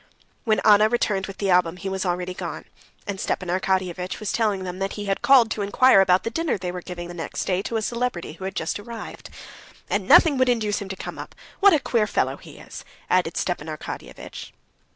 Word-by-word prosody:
When 215 Hz, -3 st, +2 dB
Anna 215 Hz, 0 st, +6 dB
returned 210 Hz, -5 st, 0 dB
with 195 Hz, -, -9 dB
the 195 Hz, -2 st, 0 dB
album, 180 Hz, -1 st, +3 dB
he 190 Hz, +2 st, -6 dB
was 190 Hz, 0 st, -2 dB
already 180 Hz, +1 st, -2 dB
gone, -, -, -6 dB, 0.4 s
and 200 Hz, -2 st, -4 dB
Stepan 180 Hz, -, -2 dB
Arkadyevitch 185 Hz, -1 st, -1 dB
was 215 Hz, -, -3 dB
telling 210 Hz, -4 st, 0 dB
them 180 Hz, 0 st, -6 dB
that 195 Hz, 0 st, -2 dB
he 205 Hz, -, -5 dB
had 195 Hz, -1 st, -1 dB
called 250 Hz, -5 st, +5 dB
to 210 Hz, -, -2 dB
inquire 205 Hz, +1 st, +5 dB
about 185 Hz, -1 st, +3 dB
the 230 Hz, -, -3 dB
dinner 330 Hz, -1 st, -1 dB
they 180 Hz, -1 st, -4 dB
were 180 Hz, 0 st, -6 dB
giving 175 Hz, -1 st, -7 dB
next 165 Hz, -, -4 dB
day 185 Hz, 0 st, 0 dB
to 225 Hz, +3 st, -3 dB
a 220 Hz, -, -2 dB
celebrity 235 Hz, -9 st, -2 dB
who 185 Hz, +3 st, -8 dB
had 195 Hz, +1 st, -5 dB
just -, -, -2 dB
arrived. 225 Hz, +2 st, -9 dB, 0.6 s
"And -, -, 0 dB
nothing 295 Hz, -6 st, +6 dB
would 255 Hz, -1 st, +3 dB
induce 215 Hz, -4 st, 0 dB
him 195 Hz, -, -6 dB
to 190 Hz, -, -4 dB
come -, -, -7 dB
up. -, -, -9 dB, 0.2 s
What 400 Hz, -1 st, +7 dB
a -, -, +2 dB
queer 230 Hz, -5 st, +1 dB
fellow -, -, 0 dB
he -, -, -14 dB
is!" -, -, -10 dB, 0.3 s
added 180 Hz, -2 st, +2 dB
Stepan 175 Hz, -4 st, -2 dB
Arkadyevitch. 155 Hz, -1 st, -8 dB
195 Hz, 215 wpm, -24 LUFS, 180-220 Hz, 0.6 s, What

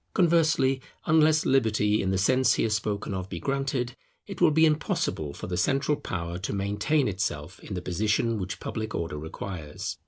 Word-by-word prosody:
Conversely, 160 Hz, -6 st, +3 dB, 0.2 s
unless 155 Hz, 0 st, +4 dB
Liberty 110 Hz, -5 st, +2 dB
in 95 Hz, -, -1 dB
the 95 Hz, -, +1 dB
sense 130 Hz, +6 st, +3 dB
here 115 Hz, -, 0 dB
spoken 105 Hz, -1 st, -1 dB
of 95 Hz, 0 st, -4 dB
be 85 Hz, -, -5 dB
granted, 135 Hz, -2 st, -1 dB, 0.3 s
it 195 Hz, -4 st, -8 dB
will 175 Hz, -, +7 dB
be 160 Hz, +1 st, +5 dB
impossible 150 Hz, -, 0 dB
for -, -, -8 dB
the 90 Hz, 0 st, -3 dB
central 140 Hz, +8 st, +2 dB
power 85 Hz, -7 st, -4 dB
to 95 Hz, -, -3 dB
maintain 105 Hz, +9 st, +1 dB
itself 95 Hz, -3 st, -3 dB
in 100 Hz, -, -7 dB
the 90 Hz, -, -4 dB
position 105 Hz, +5 st, 0 dB
which 95 Hz, -1 st, -4 dB
public 110 Hz, -1 st, -4 dB
order 80 Hz, -3 st, -3 dB
requires. 80 Hz, 0 st, -6 dB
105 Hz, 175 wpm, -27 LUFS, 95-135 Hz, 0.3 s, will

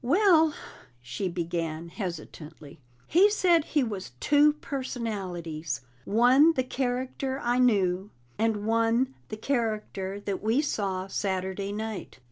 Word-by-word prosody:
"Well," 325 Hz, -, +4 dB, 0.5 s
she 125 Hz, +10 st, -3 dB
began 170 Hz, -1 st, -3 dB
hesitantly, 160 Hz, -6 st, -8 dB, 0.3 s
"he 380 Hz, +5 st, +5 dB
said 355 Hz, -6 st, +3 dB
he 295 Hz, -3 st, +1 dB
was 205 Hz, -, -5 dB
two 295 Hz, 0 st, +5 dB
personalities 195 Hz, -, -4 dB, 0.2 s
one 255 Hz, +9 st, +5 dB
the 260 Hz, -, 0 dB
character 260 Hz, +1 st, -2 dB
I 245 Hz, +1 st, +1 dB
knew, 195 Hz, -5 st, +2 dB, 0.3 s
and 220 Hz, -2 st, 0 dB
one 230 Hz, +3 st, +2 dB, 0.2 s
the 215 Hz, -, -5 dB
character 215 Hz, -5 st, -2 dB
that 200 Hz, -2 st, -3 dB
we 225 Hz, +5 st, +2 dB
saw 195 Hz, -10 st, -1 dB
Saturday 190 Hz, 0 st, -2 dB
night. 215 Hz, 0 st, -5 dB
220 Hz, 115 wpm, -27 LUFS, 185-260 Hz, 0.5 s, he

